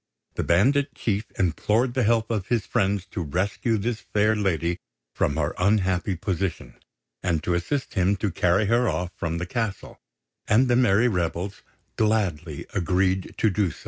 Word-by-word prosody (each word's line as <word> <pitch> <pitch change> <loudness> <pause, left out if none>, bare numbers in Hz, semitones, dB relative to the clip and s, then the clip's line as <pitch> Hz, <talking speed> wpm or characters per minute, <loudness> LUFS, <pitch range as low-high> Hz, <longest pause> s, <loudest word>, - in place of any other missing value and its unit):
The - - -2
bandit 135 - +2
chief 105 0 -1
implored 105 - +1
the 130 - +1
help 115 0 +2
of 105 -5 -2
his 115 -2 0
friends 100 -1 0
to - - -3
rescue 95 - -1
this 110 +2 -2
fair 105 +1 +1
lady 90 -4 0 0.3
from 70 - 0
her 75 -1 0
unhappy 95 -1 +1
position, 85 -7 -3 0.5
and 85 -4 0
to 90 - 0
assist 130 +11 -2
him 95 0 +2
to 100 0 -2
carry 90 +4 +2
her 120 +2 +2
off 90 0 -2
from 80 +1 -3
the 85 - -3
castle; 115 -3 -4 0.5
and 115 +5 +4
the 120 - +3
merry 120 -2 +4
rebels 90 -1 -2 0.4
gladly 90 -9 0
agreed 95 +1 0
to 110 - +2
do 95 -1 +1
so. - - -11
100 Hz, 165 wpm, -25 LUFS, 90-110 Hz, 0.5 s, and